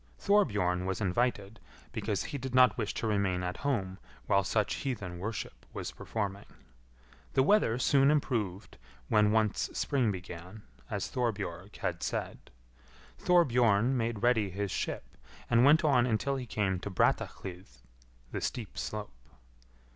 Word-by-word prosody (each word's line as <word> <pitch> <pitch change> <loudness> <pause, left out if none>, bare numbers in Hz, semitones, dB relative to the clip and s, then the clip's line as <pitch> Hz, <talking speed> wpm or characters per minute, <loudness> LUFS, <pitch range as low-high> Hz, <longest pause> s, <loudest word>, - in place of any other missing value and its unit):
Thorbjorn 105 - +2
was 95 - -2
invited, 105 0 -1 0.3
because 100 -6 -2
he 140 - -5
did 130 0 -4
not 125 -1 +6
wish 110 -3 -2
to - - -3
remain 100 -4 +1
at 90 0 -3
home 100 -10 -2 0.3
while 100 0 +3
such 105 +1 0
heathen 100 -10 -4
worship 110 +3 -5
was - - -4
performing. 100 -2 -4 0.9
The 130 - +4
weather 150 - +3
soon 135 +2 +4
improved 115 -10 -1 0.3
when 105 -1 +4
once 110 -2 +1
spring 130 -7 +1
began, 90 +2 -8 0.3
as - - -2
Thorbjorg 100 -6 -3
had - - -3
said, - - -4 0.7
Thorbjorn 125 - +4
made 115 -3 -2
ready 115 -5 +3
his 100 +1 -3
ship, - - -2 0.5
and 120 0 +5
went 150 +5 +6
on 130 -5 +4
until 125 +4 0
he 130 -2 -5
came 95 -4 0
to 100 - -5
Brattahlid 95 0 -1 0.6
(the - - -3
steep 115 -5 -4
slope). 105 - -5
110 Hz, 140 wpm, -31 LUFS, 95-125 Hz, 0.9 s, not